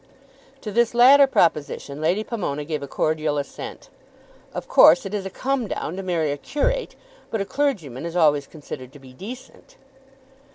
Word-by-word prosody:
To 210 - -5
this 235 +2 +1
latter 275 +3 +7
proposition 150 - 0
Lady 180 +7 +1
Pomona 160 -11 -4
gave 155 -1 -3
a 140 - -6
cordial 155 +1 -1
assent. 140 -1 -7 0.6
"Of - - -6
course 170 +5 +6
it 195 - -6
is 195 -2 -2
a - - -6
come 260 +3 -2
down 170 - -4
to 195 - -4
marry 170 -5 -1
a 145 - -3
curate, 480 - -2 0.3
but 225 - -2
a 200 - -1
clergyman 190 - -2
is 170 0 -5
always 150 -5 +3
considered 140 -4 -9
to 145 - -13
be 130 -1 -15
decent." 250 - -11
175 Hz, 170 wpm, -23 LUFS, 150-235 Hz, 0.6 s, latter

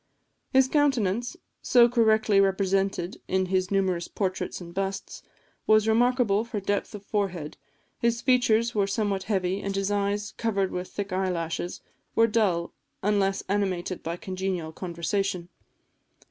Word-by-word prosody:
His 265 -1 +5
countenance, 250 - +1 0.2
so 240 -1 +6
correctly 220 -4 +3
represented 195 -1 0
in 190 0 +1
his 185 0 +1
numerous 190 -3 0
portraits 190 -2 -3
and 170 -1 -10
busts, 195 +1 -4 0.5
was 215 0 +5
remarkable 230 -2 +3
for 230 -2 -4
depth 200 +2 -2
of 205 -1 -10
forehead; 185 -7 -2 0.4
his 235 0 +1
features 235 -2 +3
were 200 -2 +1
somewhat 200 -2 -1
heavy, 190 -1 0
and 195 0 -3
his 195 +1 0
eyes, 205 +1 -1
covered 200 -4 0
with 180 0 -4
thick 200 -2 -5
eyelashes, 175 -2 -2 0.3
were 225 - +6
dull, 205 -7 +1 0.3
unless 195 -1 +1
animated 190 -2 -1
by 165 +1 -4
congenial 185 -3 -3
conversation. 175 +1 -2
195 Hz, 130 wpm, -26 LUFS, 185-220 Hz, 0.5 s, so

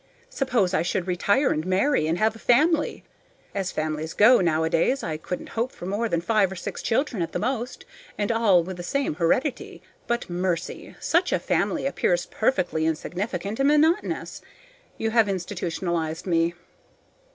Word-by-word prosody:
Suppose 240 - +1
I 170 - +2
should 175 +1 -1
retire 200 +9 +2
and 155 - -1
marry 185 - +2
and 165 +2 0
have 220 +2 +2
a - - -12
family. 305 +7 +2 0.5
As 195 -2 -2
families 155 +1 -3
go 230 +2 +6
nowadays, 165 - +1
I 160 - -2
couldn't 180 +3 -6
hope 235 +3 -2
for - - -10
more 210 +5 -1
than 170 -3 0
five 205 0 +2
or - - -5
six - - -6
children 230 -3 0
at 165 - -3
the - - 0
most, 245 +1 -3 0.3
and 205 +1 0
all 210 -7 +4
with 185 +1 -7
the - - -5
same 275 - -1
heredity. 215 - -1 0.3
But, 235 0 -1
mercy! 175 -1 -3
such 340 +3 +1
a - - +3
family - - 0
appears - - +1
perfectly 175 -9 0
insignificant 185 - -3
and 275 - +3
monotonous. 305 +3 +1 0.6
You 225 - -1
have 225 -2 +4
institutionalized 170 -3 -3
me. 170 -1 +1
190 Hz, 165 wpm, -25 LUFS, 170-235 Hz, 0.6 s, go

